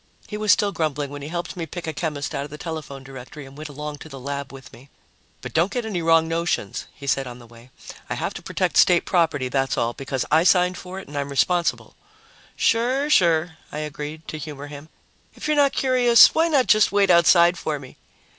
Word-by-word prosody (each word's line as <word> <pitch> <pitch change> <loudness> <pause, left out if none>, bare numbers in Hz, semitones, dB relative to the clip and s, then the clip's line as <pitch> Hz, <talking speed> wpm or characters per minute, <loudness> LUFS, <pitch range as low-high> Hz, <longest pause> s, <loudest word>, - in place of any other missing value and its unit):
He 210 - -6
was 210 -1 +2
still 200 +2 +3
grumbling 150 -5 -2
when 145 0 -7
he 140 - -6
helped 175 +2 -5
me 170 -2 -5
pick 175 +3 -7
a 160 - -3
chemist 150 -2 -4
out 140 - -2
of 145 - -8
the 150 - -9
telephone 150 -4 -7
directory 135 +2 -10
and 135 0 -14
went 155 +1 -8
along 150 +1 -7
to 160 - -11
the 135 -2 -9
lab 140 +1 -5
with 135 -1 -13
me. 135 +4 -16 0.5
"But - - -8
don't 170 +5 +2
get 245 -2 -3
any 195 -6 -3
wrong 165 0 +4
notions," 165 - -2
he 140 - -12
said 135 -1 0
on 120 -1 -8
the 120 - -14
way. 115 +1 -17 0.4
"I - - -2
have - - -3
to - - -8
protect - - -1
State 175 -1 +5
property, 160 -7 +1
that's 135 +1 -1
all, 115 +1 0
because 135 -1 -3
I 160 +2 +5
signed 180 0 +3
for 185 +1 -9
it - - -11
and 145 - -11
I'm 140 0 -2
responsible." 170 +5 0 0.6
"Sure, 260 +5 +1
sure," 165 - +2
I - - -6
agreed, 150 +1 -6
to 155 - -6
humor 145 -2 -7
him. 145 +1 -11 0.5
"If - - -6
you're 305 - +2
not 285 -2 +4
curious, 250 -3 +5
why 325 +1 +3
not 285 -6 +3
just 215 -1 +4
wait 200 -2 +3
outside 170 0 +5
for 155 -3 -3
me?" 135 -2 -12
155 Hz, 225 wpm, -23 LUFS, 140-180 Hz, 0.6 s, State